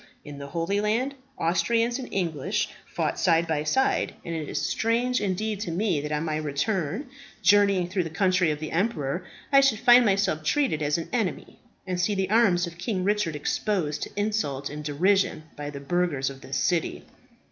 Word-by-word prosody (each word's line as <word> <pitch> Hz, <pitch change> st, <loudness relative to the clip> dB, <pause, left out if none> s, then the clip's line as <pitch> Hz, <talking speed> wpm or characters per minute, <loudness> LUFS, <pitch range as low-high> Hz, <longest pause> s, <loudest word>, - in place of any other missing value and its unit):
In 145 Hz, -1 st, -8 dB
the 140 Hz, -, -7 dB
Holy 170 Hz, +7 st, -1 dB
Land, 230 Hz, +6 st, 0 dB, 0.2 s
Austrians 230 Hz, +9 st, +1 dB
and 260 Hz, -, -7 dB
English 190 Hz, +3 st, -1 dB, 0.2 s
fought 160 Hz, -3 st, -2 dB
side 170 Hz, -2 st, +3 dB
by 155 Hz, -2 st, 0 dB
side; 265 Hz, +13 st, +1 dB
and 170 Hz, -, -4 dB
it 155 Hz, -2 st, -4 dB
is -, -, -2 dB
strange 240 Hz, +3 st, 0 dB
indeed 205 Hz, +1 st, -1 dB
to 200 Hz, -, -4 dB
me 175 Hz, -3 st, 0 dB
that 150 Hz, +1 st, -5 dB
on 150 Hz, +2 st, -1 dB
my 155 Hz, -1 st, -1 dB
return, 160 Hz, -, -2 dB, 0.4 s
journeying 200 Hz, -3 st, +4 dB
through 185 Hz, -1 st, -1 dB
the -, -, -4 dB
country 185 Hz, +1 st, +2 dB
of 150 Hz, -1 st, -2 dB
the 155 Hz, -, -5 dB
emperor, 170 Hz, -5 st, -1 dB, 0.3 s
I 275 Hz, -1 st, +7 dB
should 270 Hz, -5 st, +3 dB
find 245 Hz, +2 st, +7 dB
myself 195 Hz, -6 st, +1 dB
treated 205 Hz, -, +1 dB
as 150 Hz, +1 st, +1 dB
an 165 Hz, -, -4 dB
enemy, 225 Hz, -7 st, -2 dB, 0.3 s
and 180 Hz, -1 st, -2 dB
see 205 Hz, +3 st, +1 dB
the 195 Hz, 0 st, -1 dB
arms 200 Hz, -6 st, +4 dB
of 170 Hz, 0 st, -10 dB
King 190 Hz, 0 st, -2 dB
Richard 205 Hz, -5 st, 0 dB
exposed 155 Hz, 0 st, -1 dB
to -, -, -3 dB
insult 150 Hz, -11 st, -1 dB
and 150 Hz, +1 st, -6 dB
derision 175 Hz, +4 st, +1 dB
by 145 Hz, 0 st, -5 dB
the 140 Hz, -1 st, -7 dB
burghers 140 Hz, -3 st, 0 dB
of 135 Hz, -1 st, -12 dB
this 135 Hz, -, -4 dB
city." 175 Hz, +1 st, 0 dB
180 Hz, 190 wpm, -26 LUFS, 155-210 Hz, 0.4 s, I